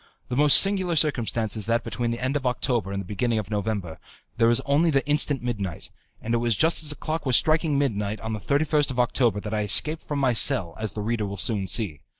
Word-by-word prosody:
The 125 - -3
most 145 +1 +7
singular 190 -3 +2
circumstance 120 -8 -1
is 105 -3 -2
that 115 +1 0
between 120 -1 -4
the 115 - -3
end 130 +3 -3
of 145 - -2
October 120 -4 -1
and 100 - -4
the 100 - -7
beginning 110 +4 -2
of 105 -1 -5
November, 100 -5 -4 0.4
there 115 - +3
is 120 - +3
only 150 +4 +1
the 140 -3 0
instant 145 -3 +2
midnight, 100 -8 -5 0.3
and 115 - -3
it - - +2
was 120 -2 0
just 160 - +2
as 155 - 0
the 150 - 0
clock 155 0 -5
was 130 -3 +2
striking 155 0 +2
midnight 105 -6 -2
on 110 0 -5
the 105 - -4
31st 145 +4 0
of 125 -2 -4
October 120 -3 +1
that 105 +1 -6
I 105 - -1
escaped 155 +10 +3
from 145 - -5
my 135 -3 +1
cell, 90 -6 +2
as 110 -1 -4
the 105 - -5
reader 110 -1 -2
will 100 0 -7
soon 100 -1 0
see. 95 - -1
120 Hz, 240 wpm, -24 LUFS, 105-145 Hz, 0.4 s, most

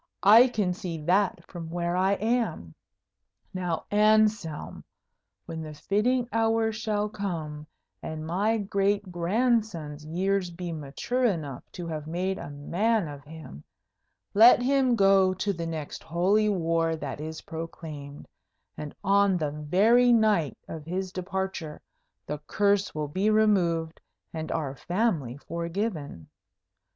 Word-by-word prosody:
I 220 +6 +8
can 210 -7 0
see 180 -4 -5
that 190 +4 +1
from 170 -3 -8
where 175 +1 -2
I 190 +2 +3
am. 210 - -1 0.8
Now, 180 -3 -2
Anselm, 210 -6 +2 0.6
when 160 0 -6
the 155 -1 -7
fitting 240 - +1
hour 225 0 +2
shall 215 -1 -1
come, 165 -8 -5 0.3
and 155 0 -5
my 200 +7 +1
great 200 -1 0
grandson's 175 -5 0
years 185 +4 0
be 175 0 -6
mature 160 - -2
enough 155 - -2
to 175 - -6
have 155 -2 -5
made 185 +4 -2
a - - -7
man 180 +8 0
of 145 -1 -9
him, 155 - -11 0.7
let 235 +4 +7
him 265 -2 +3
go 195 -2 +4
to 200 +2 -1
the 165 -2 -4
next 155 -3 -5
Holy 190 +6 +2
War 165 -3 +1
that 145 -2 -6
is 160 +1 -6
proclaimed, 155 -3 -8 0.5
and 150 -1 -7
on 200 -1 +4
the 150 -3 -1
very 200 +12 +4
night 215 - +3
of 160 -2 -7
his 185 +3 -3
departure 190 -4 -4 0.5
the 150 - -4
curse 200 -3 +1
will 150 -1 -2
be 190 +8 0
removed 180 -7 +2 0.3
and 160 -1 -4
our 145 -4 -2
family 170 - -1
forgiven. 170 - -4
180 Hz, 130 wpm, -27 LUFS, 160-210 Hz, 0.8 s, I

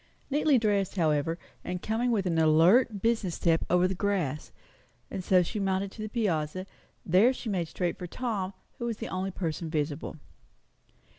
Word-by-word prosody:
Neatly 295 -1 +4
dressed, 205 -4 +1
however, 160 -2 +1 0.3
and 180 0 -3
coming 230 +3 0
with 210 -5 +1
an 165 -3 +1
alert, 185 +8 +4
business 225 -7 +1
step 165 -2 +2
over 180 +1 +4
the 190 - -2
grass, 180 -7 -1 0.6
and 190 -2 -4
so 180 0 +4
she 210 +5 -4
mounted 195 0 0
to 215 - -9
the 215 - -4
piazza. 185 -5 -1 0.4
There 190 +8 +5
she 245 - -6
made 180 -5 -1
straight 175 +2 -2
for 180 - -5
Tom, 200 -3 -3 0.3
who 235 - -3
was 230 -2 -2
the - - -5
only 185 +1 -2
person 165 -3 -3
visible. 150 -1 -2
185 Hz, 170 wpm, -29 LUFS, 165-215 Hz, 0.6 s, There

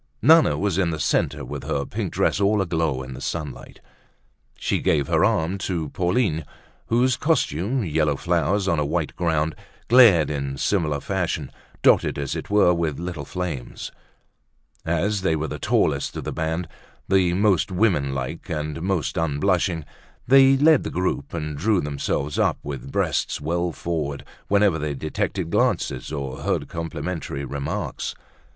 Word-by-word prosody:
Nana 160 +4 +5
was 100 -2 0
in 90 -3 +2
the 80 -2 -3
centre - - 0
with - - -6
her - - -2
pink - - -4
dress - - +1
all 105 +1 +3
aglow 80 -7 0
in 65 0 -8
the 65 - -9
sunlight. 75 -6 -5 0.8
She - - 0
gave 70 -4 +1
her - - +2
arm 85 +5 +1
to 85 -5 -2
Pauline, 90 - 0 0.4
whose 125 +2 +3
costume, 125 - 0
yellow 75 -2 +1
flowers 90 +5 0
on 85 -4 +2
a - - +2
white 80 +1 -2
ground, 80 -2 0 0.4
glared 115 -11 +7
in 70 -2 -3
similar 75 -5 0
fashion, 85 -7 -2 0.3
dotted - - +4
as 70 -1 -3
it - - -6
were 100 -3 +5
with 80 -4 -1
little 85 -4 -5
flames. 85 -8 -5 1.0
As 95 +5 0
they 80 -4 +1
were 80 0 -2
the - - -6
tallest - - +1
of - - -4
the - - -4
band, 80 +2 -2 0.4
the 95 -2 +3
most 100 0 +2
woman 90 -8 +2
like 65 -1 -5
and 75 0 -3
most 90 -4 -1
unblushing, 80 +1 0 0.4
they 135 +1 +7
led 155 +1 +5
the - - -4
troop 90 -6 -2
and 75 -2 -4
drew 95 +7 +2
themselves 70 -1 -2
up - - +2
with 70 -2 -6
breasts - - 0
well 85 +3 -1
forward 75 -2 -3 0.2
whenever 100 -5 +3
they 75 -1 -2
detected 80 +4 -3
glances 65 -4 0
or 70 -3 -4
heard - - -1
complimentary 80 -3 -4
remarks. 70 +1 -4
85 Hz, 155 wpm, -23 LUFS, 75-95 Hz, 1.0 s, glared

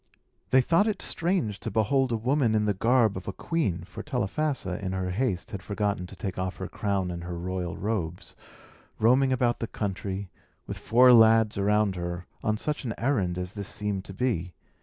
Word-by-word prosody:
They 130 - +6
thought 165 - +3
it 210 -3 -1
strange 165 - 0
to - - -4
behold 120 +5 +2
a 115 - +1
woman 125 0 +1
in 105 0 +2
the 105 - +2
garb 115 +1 +3
of 95 - -7
a - - -1
queen 100 - -1
(for 100 +4 -8
Telephassa, 125 -5 -2
in 95 -1 -2
her 95 -1 -2
haste, 110 -1 -1
had 100 -4 -5
forgotten 100 -2 -2
to 95 - -11
take 95 0 -5
off 95 -1 -2
her 95 - -4
crown 100 -3 -1
and 85 -1 -6
her 90 0 -5
royal 90 0 -3
robes), 90 -5 -3 0.6
roaming 130 +4 +4
about 125 -1 +1
the 115 - -2
country, 100 -2 -4 0.3
with - - -6
four 125 +2 +6
lads 110 -2 +6
around 105 -1 +2
her, 85 0 -4 0.2
on 110 0 +1
such 150 +6 -3
an 115 -4 -3
errand 100 -9 0
as 90 +1 -4
this 100 -2 -5
seemed 105 -2 -2
to 95 - -9
be. 95 -9 -1
105 Hz, 195 wpm, -27 LUFS, 95-125 Hz, 0.6 s, They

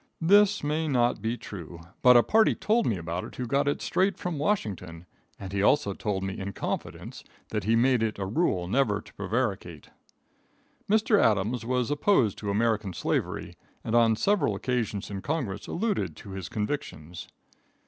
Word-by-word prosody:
This 205 +3 +4
may 155 +2 -1
not 120 -4 +1
be 115 +2 -2
true, 85 -7 -9 0.2
but 125 -1 +8
a 120 - +6
party 220 0 +3
told 225 +2 +1
me 105 - 0
about 85 +1 -4
it - - -9
who 125 - -3
got 140 +4 +1
it 145 - -1
straight 190 +2 +1
from 175 -5 -4
Washington, 95 - -2 0.3
and 95 -1 -7
he 100 - 0
also 100 -2 +3
told 95 -1 -3
me 95 0 -4
in 100 +1 -5
confidence - - -5 0.3
that - - -3
he 115 +2 +3
made 125 0 +3
it 110 -1 -1
a 100 - -3
rule 95 - 0
never 105 -1 +1
to - - -15
prevaricate. 100 - -3 1.0
Mr. 215 0 +4
Adams 110 +2 +1
was 125 0 0
opposed 145 - +2
to 105 - -4
American 110 -2 0
slavery, - - -2 0.3
and 110 - -4
on 115 -1 +5
several 205 - +1
occasions 115 -6 -2
in 100 -1 -4
Congress 125 -10 -3
alluded 210 +2 -1
to 100 - -11
his 95 -3 -6
convictions. 105 - -5
115 Hz, 170 wpm, -27 LUFS, 100-145 Hz, 1.0 s, but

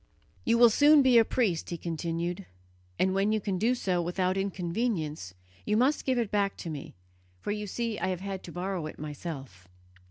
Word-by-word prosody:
"You 230 0 +3
will 240 -1 +7
soon 290 +4 +6
be 250 -3 +6
a - - +6
priest," 215 -8 0
he 170 - -3
continued, 170 +3 -3 0.5
"and 190 0 +2
when 195 +2 +2
you 215 - +2
can 195 -2 -2
do 235 +5 +2
so 185 -7 0
without 180 +2 0
inconvenience, 175 - -2 0.3
you 210 - +1
must 265 +6 +2
give 260 -2 +1
it 230 -4 -1
back 200 -1 +1
to 165 - -6
me, 145 -3 -7 0.4
for 205 - -3
you 210 0 -3
see 230 +1 -3
I 185 - -1
have 185 -1 -2
had 195 -1 -4
to 170 - -8
borrow 180 -2 -3
it - - -9
myself." 140 - -7
190 Hz, 195 wpm, -29 LUFS, 170-220 Hz, 0.5 s, will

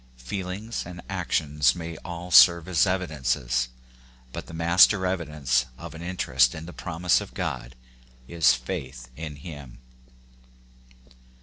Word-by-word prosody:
Feelings 95 - -5
and 90 0 -9
actions 75 -7 +1
may 85 -1 -6
all 85 +2 -8
serve 85 0 +7
as 90 0 +3
evidences; 65 -9 -1 0.7
but - - -6
the - - -11
mas 85 +3 +6
ter 95 -3 -2
evidence 75 -9 0
of 85 0 -9
an 80 - -9
interest 65 -8 +1
in 80 +1 -7
the 90 - -9
promise 85 0 0
of - - -10
God 60 0 -4 0.5
is 80 -7 +4
faith 65 0 -7
in 75 -1 -6
him. 70 -4 -10
80 Hz, 130 wpm, -26 LUFS, 65-90 Hz, 0.7 s, serve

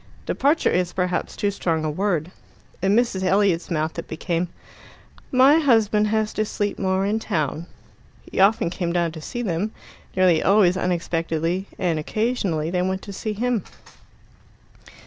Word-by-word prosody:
Departure 290 +4 +2
is 180 0 0
perhaps 180 -1 -1
too 205 - 0
strong 165 -5 -1
a - - 0
word. 180 -1 -1 0.5
In 195 +2 +3
Mrs. 235 -5 +1
Elliot's 190 -2 +2
mouth 160 -1 -2
it - - -7
became, 170 +2 -2 0.8
"My 270 +5 +6
husband 220 -7 +3
has 215 0 0
to 215 - 0
sleep 205 -1 -3
more 190 0 +1
in 210 +2 0
town." 160 - -2 0.6
He - - -3
often 200 -2 +4
came 175 -1 -2
down 170 -2 +1
to 160 -1 -9
see 240 +10 -5
them, 195 +2 -2 0.4
nearly 185 -4 +4
always 195 -2 +4
unexpectedly, 170 0 -1
and 170 -4 0
occasionally 180 -4 -1
they 180 0 0
went 190 +1 -2
to 200 - -8
see 215 +2 -3
him. 235 -1 -1
190 Hz, 150 wpm, -23 LUFS, 170-215 Hz, 0.8 s, My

